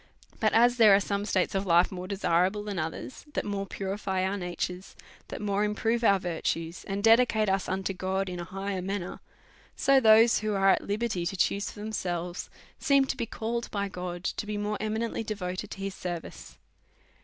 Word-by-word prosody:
But -, -, +2 dB
as 240 Hz, +2 st, +5 dB
there 215 Hz, -4 st, +8 dB
are -, -, +5 dB
some 200 Hz, 0 st, -2 dB
states 190 Hz, -3 st, 0 dB
of 195 Hz, 0 st, -1 dB
life 175 Hz, +1 st, +4 dB
more 185 Hz, -1 st, -6 dB
desi 200 Hz, +1 st, -3 dB
rable 185 Hz, +5 st, +2 dB
than 200 Hz, -4 st, -3 dB
others, 160 Hz, +10 st, -5 dB
that -, -, -1 dB
more 200 Hz, -1 st, -3 dB
purify 190 Hz, -1 st, -2 dB
our 190 Hz, +1 st, -1 dB
natures, 180 Hz, 0 st, -4 dB, 0.3 s
that -, -, -6 dB
more 200 Hz, 0 st, +1 dB
improve 225 Hz, +3 st, 0 dB
our 200 Hz, -3 st, +5 dB
virtues, 165 Hz, -1 st, -3 dB
and 200 Hz, 0 st, -3 dB
dedicate 225 Hz, -1 st, +5 dB
us 195 Hz, 0 st, 0 dB
unto 190 Hz, +1 st, -1 dB
God 190 Hz, +1 st, -2 dB
in 180 Hz, -1 st, -5 dB
a -, -, -3 dB
higher 195 Hz, +1 st, -4 dB
manner; 185 Hz, -1 st, -4 dB, 0.6 s
so 275 Hz, 0 st, +4 dB
those 225 Hz, 0 st, +6 dB
who 215 Hz, -1 st, -1 dB
are 195 Hz, 0 st, +5 dB
at -, -, +2 dB
liberty 205 Hz, -3 st, -1 dB
to 195 Hz, -, -4 dB
choose 200 Hz, +2 st, +1 dB
for 205 Hz, -, -10 dB
themselves 180 Hz, -4 st, -3 dB, 0.3 s
seem 275 Hz, -2 st, +4 dB
to 270 Hz, -, -2 dB
be 235 Hz, -3 st, -3 dB
called 235 Hz, +2 st, -3 dB
by 200 Hz, -1 st, -2 dB
God 180 Hz, -1 st, -6 dB
to 210 Hz, -, -3 dB
be 210 Hz, 0 st, -3 dB
morje 210 Hz, 0 st, -2 dB
eminently 220 Hz, +2 st, -2 dB
devoted 195 Hz, -2 st, -4 dB
to -, -, -8 dB
his 195 Hz, 0 st, -3 dB
service. 175 Hz, -3 st, -7 dB
200 Hz, 195 wpm, -28 LUFS, 185-215 Hz, 0.6 s, there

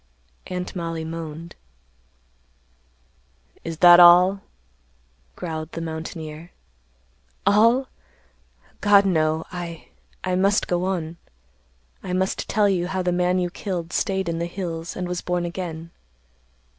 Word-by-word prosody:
Aunt 180 Hz, +1 st, -5 dB
Mollie 165 Hz, -2 st, -4 dB
moaned. 165 Hz, 0 st, -7 dB, 2.1 s
"Is 165 Hz, -1 st, -5 dB
that 175 Hz, 0 st, +10 dB
all?" 180 Hz, +3 st, +7 dB, 0.9 s
growled 160 Hz, -2 st, -6 dB
the -, -, -4 dB
mountaineer. 160 Hz, 0 st, -7 dB, 1.0 s
"All! 230 Hz, +6 st, +4 dB, 0.9 s
God, 205 Hz, -1 st, +5 dB
no! 160 Hz, -3 st, +1 dB
I—I 175 Hz, +1 st, -7 dB
must 200 Hz, +2 st, +2 dB
go 175 Hz, 0 st, 0 dB
on. 170 Hz, -3 st, -3 dB, 0.8 s
I 180 Hz, -, -5 dB
must 190 Hz, +1 st, -1 dB
tell 210 Hz, -1 st, +3 dB
you 180 Hz, -3 st, 0 dB
how 185 Hz, 0 st, -2 dB
the 180 Hz, -, +1 dB
man 180 Hz, +1 st, +1 dB
you 180 Hz, -1 st, -1 dB
killed 175 Hz, -4 st, -5 dB
staid 190 Hz, -2 st, -1 dB
in 165 Hz, 0 st, -2 dB
the 170 Hz, -, -2 dB
hills 170 Hz, -2 st, -5 dB
and 180 Hz, -, -3 dB
was 180 Hz, 0 st, -3 dB
born 180 Hz, -1 st, -1 dB
again. 170 Hz, -2 st, -6 dB
175 Hz, 120 wpm, -23 LUFS, 165-185 Hz, 2.1 s, that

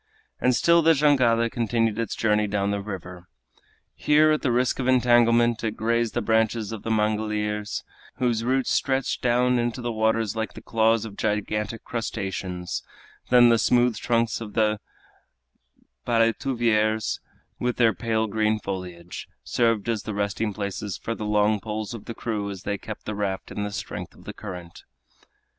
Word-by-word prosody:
And 125 Hz, -1 st, +3 dB
still 170 Hz, +5 st, +4 dB
the 165 Hz, 0 st, +5 dB
jangada 130 Hz, -6 st, +3 dB
continued 115 Hz, -1 st, 0 dB
its 115 Hz, -3 st, -2 dB
journey 105 Hz, -1 st, +2 dB
down 100 Hz, -1 st, 0 dB
the 100 Hz, 0 st, -1 dB
river. 90 Hz, -3 st, -8 dB, 0.7 s
Here, 155 Hz, +1 st, +4 dB
at 155 Hz, -, +1 dB
the 130 Hz, -, +1 dB
risk 125 Hz, +2 st, +1 dB
of 130 Hz, -, -1 dB
entanglement, 120 Hz, -2 st, +4 dB
it 110 Hz, -1 st, -2 dB
grazed 115 Hz, 0 st, 0 dB
the 120 Hz, -, 0 dB
branches 110 Hz, 0 st, +1 dB
of 110 Hz, -2 st, -6 dB
the -, -, -5 dB
mangliers, 105 Hz, -1 st, -1 dB, 0.3 s
whose 120 Hz, -3 st, 0 dB
roots 130 Hz, +2 st, +1 dB
stretched 135 Hz, -1 st, 0 dB
down 125 Hz, 0 st, +3 dB
into 120 Hz, +1 st, -1 dB
the 120 Hz, -1 st, -2 dB
waters 110 Hz, -1 st, +1 dB
like 110 Hz, 0 st, -3 dB
the -, -, -9 dB
claws 115 Hz, 0 st, +2 dB
of 100 Hz, -3 st, -9 dB
gigantic 105 Hz, +1 st, -2 dB
crustaceans; 95 Hz, -5 st, -4 dB, 0.5 s
then 120 Hz, -1 st, +7 dB
the 115 Hz, -1 st, +4 dB
smooth 120 Hz, 0 st, +3 dB
trunks 115 Hz, +1 st, 0 dB
of 105 Hz, -2 st, -7 dB
the 110 Hz, -1 st, +2 dB, 1.3 s
paletuviers, 115 Hz, -2 st, +1 dB, 0.4 s
with 125 Hz, 0 st, -1 dB
their 115 Hz, -3 st, +4 dB
pale 110 Hz, +3 st, 0 dB
green 110 Hz, 0 st, +1 dB
foliage, 90 Hz, -4 st, -6 dB, 0.2 s
served 115 Hz, -3 st, +1 dB
as 115 Hz, -3 st, 0 dB
the 110 Hz, 0 st, -5 dB
resting 105 Hz, +1 st, -1 dB
places 100 Hz, -1 st, -4 dB
for 115 Hz, -, -4 dB
the 110 Hz, -, -5 dB
long 105 Hz, 0 st, +2 dB
poles 110 Hz, +1 st, -4 dB
of 115 Hz, -, -8 dB
the 115 Hz, -, -6 dB
crew 105 Hz, -3 st, -3 dB
as 95 Hz, -2 st, -7 dB
they 100 Hz, -1 st, -2 dB
kept 110 Hz, -1 st, -8 dB
the 110 Hz, -, -3 dB
raft 100 Hz, -2 st, -3 dB
in -, -, -4 dB
the 105 Hz, 0 st, -3 dB
strength 100 Hz, -, -6 dB
of -, -, -17 dB
the -, -, -7 dB
current. 90 Hz, -4 st, -9 dB
110 Hz, 165 wpm, -25 LUFS, 105-120 Hz, 1.3 s, then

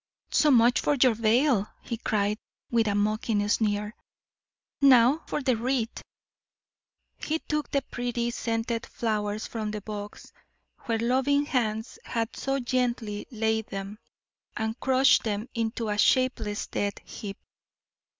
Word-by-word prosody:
"So 305 Hz, -, +4 dB
much 245 Hz, -2 st, +5 dB
for 295 Hz, -, +2 dB
your 255 Hz, -3 st, +5 dB
veil!" 225 Hz, 0 st, +2 dB, 0.2 s
he 235 Hz, -, -4 dB
cried, 210 Hz, -2 st, 0 dB, 0.3 s
with 230 Hz, -2 st, +3 dB
a 205 Hz, -, +1 dB
mocking 210 Hz, 0 st, 0 dB
sneer. 210 Hz, 0 st, 0 dB, 0.9 s
"Now 265 Hz, +2 st, +6 dB
for 295 Hz, -, -2 dB
the 255 Hz, -2 st, +2 dB
wreath!" 240 Hz, 0 st, -1 dB, 1.2 s
He 315 Hz, -, -1 dB
took 300 Hz, -2 st, -3 dB
the 280 Hz, -1 st, 0 dB
pretty, 240 Hz, -1 st, -2 dB
scented 230 Hz, 0 st, -2 dB
flowers 215 Hz, -2 st, -2 dB
from 220 Hz, -2 st, -4 dB
the 210 Hz, 0 st, -4 dB
box, 205 Hz, 0 st, -8 dB, 0.5 s
where 230 Hz, -1 st, 0 dB
loving 265 Hz, +5 st, +2 dB
hands 225 Hz, -4 st, -2 dB
had 230 Hz, -1 st, -3 dB
so 270 Hz, 0 st, -1 dB
gently 240 Hz, -4 st, -1 dB
laid 220 Hz, -2 st, -1 dB
them, 195 Hz, +2 st, -6 dB, 0.6 s
and 220 Hz, +2 st, -2 dB
crushed 265 Hz, 0 st, +4 dB
them 215 Hz, +1 st, -3 dB
into 230 Hz, 0 st, -2 dB
a 210 Hz, 0 st, -1 dB
shapeless, 230 Hz, -5 st, +2 dB
dead 200 Hz, 0 st, -2 dB
heap. 200 Hz, -2 st, -7 dB
230 Hz, 130 wpm, -27 LUFS, 210-255 Hz, 1.2 s, Now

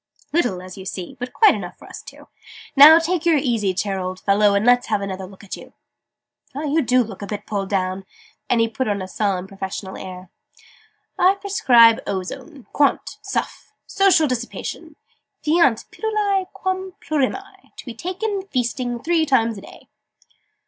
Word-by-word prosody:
"Little, 245 Hz, -, 0 dB
as 185 Hz, +1 st, -10 dB
you 190 Hz, -, -9 dB
see, 185 Hz, -2 st, -6 dB
but 250 Hz, 0 st, -5 dB
quite 435 Hz, -, +5 dB
enough -, -, -7 dB
for -, -, -15 dB
us -, -, -9 dB
two. -, -, -14 dB, 0.5 s
Now, 300 Hz, +3 st, +10 dB
take 335 Hz, +1 st, 0 dB
the 340 Hz, 0 st, +3 dB
easy 235 Hz, -9 st, +1 dB
chair, 195 Hz, +1 st, -2 dB
old 185 Hz, 0 st, -5 dB
fellow, 200 Hz, 0 st, +3 dB
and 200 Hz, +2 st, +1 dB
let's 245 Hz, 0 st, +4 dB
have -, -, 0 dB
another 190 Hz, -1 st, -5 dB
look 195 Hz, +1 st, -15 dB
at 200 Hz, -, -6 dB
you! -, -, -14 dB, 0.8 s
Well, 295 Hz, +2 st, -3 dB
you 310 Hz, +3 st, +2 dB
do 255 Hz, -1 st, +3 dB
look 210 Hz, -3 st, -10 dB
a 200 Hz, -, -5 dB
bit 205 Hz, 0 st, -6 dB
pulled 195 Hz, -2 st, -3 dB
down!" 190 Hz, -1 st, -2 dB, 0.4 s
and 240 Hz, -, +2 dB
he 230 Hz, -, +3 dB
put 230 Hz, +3 st, -3 dB
on 200 Hz, -2 st, -1 dB
a -, -, -7 dB
solemn 190 Hz, -2 st, -1 dB
professional 190 Hz, 0 st, -6 dB
air. 185 Hz, -1 st, -9 dB, 0.9 s
"I 375 Hz, +2 st, +5 dB
prescribe 245 Hz, -, +4 dB
Ozone, 200 Hz, -, -6 dB
quant. 285 Hz, -1 st, +1 dB
suff. -, -, -4 dB
Social 380 Hz, -5 st, +3 dB
dissipation, 245 Hz, -2 st, -5 dB, 0.5 s
fiant 300 Hz, -7 st, +3 dB
pilulae 415 Hz, -3 st, -1 dB
quam 375 Hz, 0 st, -3 dB
plurimae: 385 Hz, +7 st, -3 dB
to -, -, -10 dB
be 245 Hz, -, -7 dB
taken, 380 Hz, -, -4 dB
feasting, 245 Hz, -3 st, -2 dB
three 335 Hz, 0 st, +2 dB
times 230 Hz, -6 st, +1 dB
a -, -, -13 dB
day!" -, -, -15 dB
245 Hz, 170 wpm, -21 LUFS, 195-330 Hz, 0.9 s, Now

